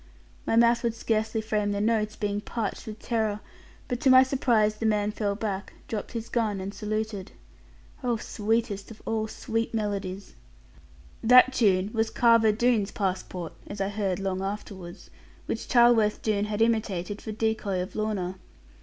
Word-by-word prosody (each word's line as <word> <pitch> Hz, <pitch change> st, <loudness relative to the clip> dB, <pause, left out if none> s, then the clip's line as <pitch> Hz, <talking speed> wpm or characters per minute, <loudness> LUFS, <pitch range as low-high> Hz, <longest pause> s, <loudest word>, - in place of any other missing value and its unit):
My -, -, +2 dB
mouth 235 Hz, 0 st, +5 dB
would 235 Hz, -2 st, -1 dB
scarcely 220 Hz, -1 st, 0 dB
frame 210 Hz, -1 st, -1 dB
the 200 Hz, -, -1 dB
notes, 215 Hz, 0 st, +1 dB
being 205 Hz, -1 st, -2 dB
parched 220 Hz, -1 st, -4 dB
with 215 Hz, -1 st, -6 dB
terror; 220 Hz, -2 st, -1 dB, 0.5 s
but 245 Hz, -2 st, -2 dB
to 270 Hz, -, +3 dB
my 260 Hz, 0 st, +9 dB
surprise, 235 Hz, -5 st, +2 dB
the 225 Hz, -, -3 dB
man 210 Hz, -1 st, +1 dB
fell 205 Hz, -2 st, -1 dB
back, 200 Hz, -2 st, -4 dB
dropped 215 Hz, +1 st, -5 dB
his 230 Hz, -1 st, -4 dB
gun, 220 Hz, -4 st, 0 dB
and 190 Hz, +1 st, -5 dB
saluted. 215 Hz, -2 st, -4 dB, 0.7 s
Oh, 240 Hz, -2 st, +1 dB
sweetest 215 Hz, -1 st, -2 dB
of 225 Hz, -, -13 dB
all 220 Hz, -1 st, -1 dB
sweet 225 Hz, +1 st, -3 dB
melodies! 200 Hz, -3 st, -3 dB, 0.9 s
That 250 Hz, +3 st, +7 dB
tune 200 Hz, -4 st, +2 dB
was 225 Hz, -1 st, +1 dB
Carver 230 Hz, -2 st, +4 dB
Doone's 220 Hz, -2 st, +2 dB
passport 185 Hz, -3 st, -3 dB
(as 205 Hz, -, -7 dB
I 195 Hz, 0 st, 0 dB
heard 200 Hz, -3 st, -1 dB
long 190 Hz, -1 st, -2 dB
afterwards), 195 Hz, -2 st, -7 dB, 0.3 s
which -, -, -4 dB
Charleworth 235 Hz, -4 st, +4 dB
Doone 210 Hz, -2 st, +1 dB
had 210 Hz, +1 st, +1 dB
imitated, 210 Hz, -4 st, -1 dB
for 220 Hz, -, -6 dB
decoy 215 Hz, -3 st, -1 dB
of 180 Hz, +1 st, -5 dB
Lorna. 195 Hz, -4 st, -2 dB
215 Hz, 160 wpm, -27 LUFS, 200-225 Hz, 0.9 s, my